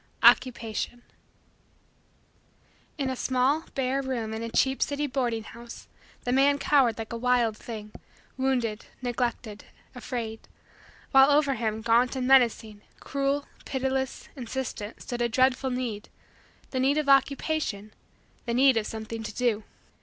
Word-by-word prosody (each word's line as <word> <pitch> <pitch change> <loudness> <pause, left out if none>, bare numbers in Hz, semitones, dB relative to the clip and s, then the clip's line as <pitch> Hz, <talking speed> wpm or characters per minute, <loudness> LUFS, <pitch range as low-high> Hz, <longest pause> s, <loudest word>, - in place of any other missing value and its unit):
OCCUPATION 240 -1 +3 1.9
In 270 -3 -1
a - - -3
small, 260 +5 +1
bare, 270 0 0
room 240 -5 -3
in 220 - -4
a 230 - -4
cheap 265 +3 +1
city 290 +1 0
boarding 245 -5 -1
house, 235 +1 -11 0.4
the 245 - -1
man 275 +2 +4
cowered 275 -5 +3
like 225 +1 -6
a - - -3
wild 240 -2 +2
thing, 215 -2 -8 0.4
wounded, 250 -5 -1 0.2
neglected, 240 -3 -3 0.3
afraid; 235 -3 -5 0.7
while 270 +1 +7
over 285 -1 +3
him, 220 -2 -2
gaunt 235 +3 +3
and 255 -1 -2
menacing, 230 -5 +3 0.2
cruel, 280 +1 -1 0.2
pitiless, 265 0 -2
insistent, 245 -4 -5
stood 240 -1 -4
a 240 - +2
dreadful 260 +2 +2
need 245 -4 -4 0.6
the 260 - -1
need 275 +3 +2
of 305 -2 0
Occupation 275 -6 +1 0.5
the 235 - 0
need 260 -1 +5
of 215 - 0
something 220 0 -6
to 215 -1 -6
do. 235 -4 0
250 Hz, 135 wpm, -27 LUFS, 225-270 Hz, 1.9 s, while